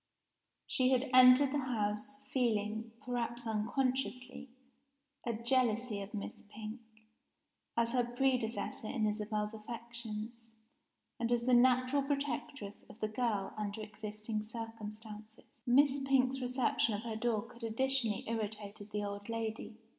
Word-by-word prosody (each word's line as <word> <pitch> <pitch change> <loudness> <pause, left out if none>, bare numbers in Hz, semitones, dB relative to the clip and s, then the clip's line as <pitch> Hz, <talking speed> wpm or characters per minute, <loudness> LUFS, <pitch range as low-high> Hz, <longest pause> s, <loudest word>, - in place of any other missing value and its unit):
She 255 -1 +2
had 260 0 +2
entered 255 +2 +8
the 290 - +1
house, 225 -1 -1 0.2
feeling 220 -2 +1
(perhaps 240 -1 -2
unconsciously) 250 +3 -1 0.8
a 235 - +1
jealousy 235 -2 +1
of 200 +2 -6
Miss 210 +1 -5
Pink, 215 +2 -6 1.0
as 235 0 +3
her 250 -1 +3
predecessor 240 -3 0
in 225 -3 0
Isabel's 210 0 -1
affections, 230 0 -7 0.7
and 235 0 0
as 240 -1 +3
the 250 +1 +3
natural 255 +3 +5
protectress 275 -6 -3
of 220 - -13
the 215 - -1
girl 215 -3 0
under 210 0 -3
existing 215 +1 -4
circumstances. 215 -1 -7 0.2
Miss 280 +3 +5
Pink's 270 -1 +2
reception 250 -3 +2
of 205 - -4
her 230 -2 -3
dog 230 0 -1
had 235 0 -12
additionally 230 -1 +1
irritated 215 -2 -4
the 210 0 -2
old 200 +1 -5
lady. 225 -1 -3
230 Hz, 125 wpm, -34 LUFS, 215-255 Hz, 1.0 s, entered